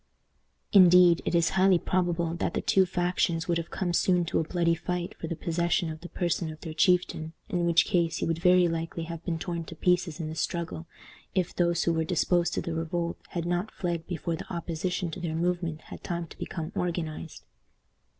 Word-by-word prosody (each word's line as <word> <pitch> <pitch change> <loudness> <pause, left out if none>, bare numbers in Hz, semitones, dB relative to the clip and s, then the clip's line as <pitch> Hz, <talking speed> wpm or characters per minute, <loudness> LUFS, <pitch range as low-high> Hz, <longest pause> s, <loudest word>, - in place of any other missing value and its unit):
Indeed, 180 -2 +7
it - - 0
is 170 -2 +3
highly 190 -1 +4
probable 170 -2 0
that 170 0 -2
the - - 0
two 190 -1 +3
factions 175 -2 0
would 170 -1 +1
have 165 - -6
come 175 -2 -2
soon 180 0 +3
to - - 0
a - - +1
bloody 170 +1 +1
fight 175 +1 -3
for 165 - -4
the 170 - -3
possession 170 +1 0
of 155 0 -9
the 175 - -9
person 170 -2 -1
of 155 - -11
their 160 -3 -6
chieftain, 160 -1 +1 0.2
in 175 -1 0
which 170 -1 +5
case 170 -4 +1
he - - -1
would 165 0 -1
very 180 0 +5
likely 165 0 -3
have 165 0 -7
been 170 -2 -2
torn 170 0 -4
to 165 - -9
pieces 180 0 +1
in 160 - -3
the 155 - -5
struggle, 165 0 -3 0.5
if 180 -2 0
those 170 -1 +2
who 170 - +2
were 160 0 +1
disposed 175 +1 +1
to - - 0
revolt 170 +1 -2
had 170 -1 -3
not 175 +4 -1
fled 170 -5 -3
before 170 -1 -2
the - - -9
opposition 175 +1 -2
to 185 - -6
their 165 -2 -3
movement 170 -2 -1
had - - -11
time 170 -1 -3
to - - -15
become 160 -4 -5
organized. 170 -2 -4
170 Hz, 205 wpm, -28 LUFS, 165-180 Hz, 0.5 s, Indeed